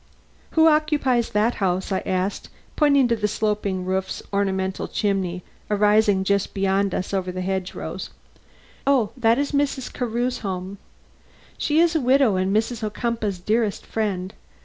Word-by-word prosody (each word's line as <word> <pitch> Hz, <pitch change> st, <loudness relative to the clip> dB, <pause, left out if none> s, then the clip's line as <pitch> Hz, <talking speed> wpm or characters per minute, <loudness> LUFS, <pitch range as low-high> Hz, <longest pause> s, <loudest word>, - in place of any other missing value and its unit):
"Who 320 Hz, -, +7 dB
occupies 300 Hz, -6 st, +2 dB
that 215 Hz, +3 st, +2 dB
house?" 185 Hz, +1 st, 0 dB
I 190 Hz, -, +1 dB
asked, 185 Hz, +2 st, -2 dB, 0.3 s
pointing 280 Hz, -4 st, +4 dB
to 235 Hz, -, +3 dB
the 210 Hz, -2 st, 0 dB
sloping 210 Hz, -3 st, -1 dB
roofs 190 Hz, 0 st, -2 dB
and -, -, -22 dB
ornamental 190 Hz, -1 st, -1 dB
chimneys 190 Hz, -4 st, -1 dB, 0.3 s
arising 210 Hz, -1 st, +3 dB
just 200 Hz, 0 st, 0 dB
beyond 195 Hz, 0 st, +1 dB
us 185 Hz, -, -3 dB
over 185 Hz, -2 st, -1 dB
the 185 Hz, 0 st, -4 dB
hedge 190 Hz, 0 st, -3 dB
rows. -, -, -5 dB, 0.8 s
"Oh, 260 Hz, -7 st, +3 dB
that 230 Hz, -2 st, +3 dB
is 285 Hz, 0 st, -1 dB
Mrs. 280 Hz, -3 st, -1 dB
Carew's 245 Hz, +1 st, -1 dB
home. 190 Hz, -1 st, -5 dB, 0.8 s
She 300 Hz, +1 st, +1 dB
is 335 Hz, 0 st, +3 dB
a 315 Hz, -, +2 dB
widow 255 Hz, -4 st, +4 dB
and 185 Hz, +1 st, 0 dB
Mrs. 225 Hz, +2 st, 0 dB
Ocumpaugh's 215 Hz, -2 st, -2 dB
dearest 215 Hz, +3 st, -1 dB
friend. 195 Hz, -4 st, -2 dB
210 Hz, 150 wpm, -23 LUFS, 190-245 Hz, 0.8 s, Who